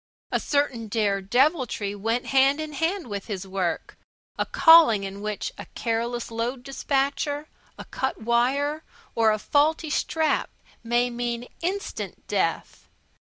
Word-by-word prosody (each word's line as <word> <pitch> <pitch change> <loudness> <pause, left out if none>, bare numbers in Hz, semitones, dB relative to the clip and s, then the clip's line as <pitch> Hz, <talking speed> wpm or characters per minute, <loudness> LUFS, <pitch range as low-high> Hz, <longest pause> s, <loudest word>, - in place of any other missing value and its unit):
A - - +1
certain 280 -6 0
dare 205 -2 0
deviltry 245 - +1
went 225 +4 -1
hand 270 +2 +4
in 310 -1 -5
hand 330 +3 -1
with 200 -3 -5
his 200 -3 -4
work 185 -3 -3 0.4
a - - -2
calling 325 - +7
in 195 +1 -6
which 210 -1 -3
a - - -8
careless 235 +1 -2
load 240 +3 -3
dispatcher, 280 +2 -1 0.3
a - - -8
cut 265 - -3
wire, 265 +7 +1 0.3
or 225 -1 +3
a 215 - +1
faulty 300 +6 +1
strap 315 +1 0 0.3
may 240 +1 +1
mean 240 0 -3
instant 385 +4 -4
death. - - -2
245 Hz, 135 wpm, -25 LUFS, 220-290 Hz, 0.4 s, calling